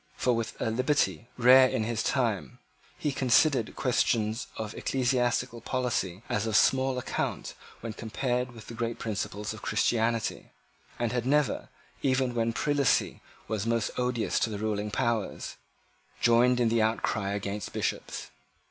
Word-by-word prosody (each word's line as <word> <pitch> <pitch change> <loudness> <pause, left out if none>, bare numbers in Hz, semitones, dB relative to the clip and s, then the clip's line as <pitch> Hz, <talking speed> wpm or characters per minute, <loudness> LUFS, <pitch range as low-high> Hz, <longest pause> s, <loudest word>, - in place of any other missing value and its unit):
For, 125 - +1
with 115 -1 -3
a 110 - 0
liberty 115 - +1
rare 130 +2 +8
in 110 - -1
his 110 0 -1
time, 110 - -1 0.4
he 150 - -1
considered 130 -1 +3
questions 115 -3 +1
of 110 -1 -4
ecclesiastical 125 -2 0
polity 115 -7 -2
as 105 +1 -1
of 110 - -1
small 130 +3 +3
account 125 - -3 0.3
when 115 -1 -5
compared 125 +3 -2
with 115 -3 -11
the - - -9
great 115 0 -3
principles 105 -1 -3
of 110 - -10
Christianity, 115 +1 0 0.5
and 120 -2 -1
had 125 0 -1
never, 145 0 +1 0.3
even 130 -2 +1
when 115 -1 +1
prelacy 145 +2 +1 0.3
was 110 0 -2
most 115 -1 +1
odious 125 -3 0
to - - +1
the 105 - -4
ruling 105 0 -2
powers, 115 -2 -2 0.6
joined 120 +1 +4
in 120 -2 +3
the 115 0 +2
outcry 110 -2 0
against 100 0 -4
Bishops. - - -3
115 Hz, 145 wpm, -28 LUFS, 110-125 Hz, 0.6 s, rare